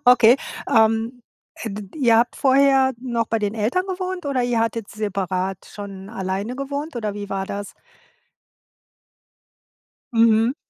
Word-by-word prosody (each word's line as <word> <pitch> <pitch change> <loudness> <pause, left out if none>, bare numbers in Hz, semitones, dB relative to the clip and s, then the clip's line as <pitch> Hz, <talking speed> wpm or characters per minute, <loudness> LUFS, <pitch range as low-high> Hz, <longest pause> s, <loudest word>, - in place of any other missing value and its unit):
Okay, 245 -1 +7 0.3
ähm, 225 +2 +2 0.4
d 210 -1 -4
ihr 240 -6 +4
habt 240 +1 +2
vorher 270 -1 +4
noch 235 -3 -1
bei 225 - +1
den 205 0 -2
Eltern 230 - 0
gewohnt, 370 -2 -4
oder 265 -3 0
ihr 245 -1 +1
hattet 225 -2 -1
separat 190 -3 -2
schon 200 -2 -9
alleine 195 +3 -3
gewohnt, 280 +1 -4
oder 215 -3 -2
wie 205 -1 -6
war 195 0 -2
das? 200 0 -6 2.4
Mhm. 225 +1 +4
230 Hz, 130 wpm, -22 LUFS, 205-260 Hz, 2.4 s, Okay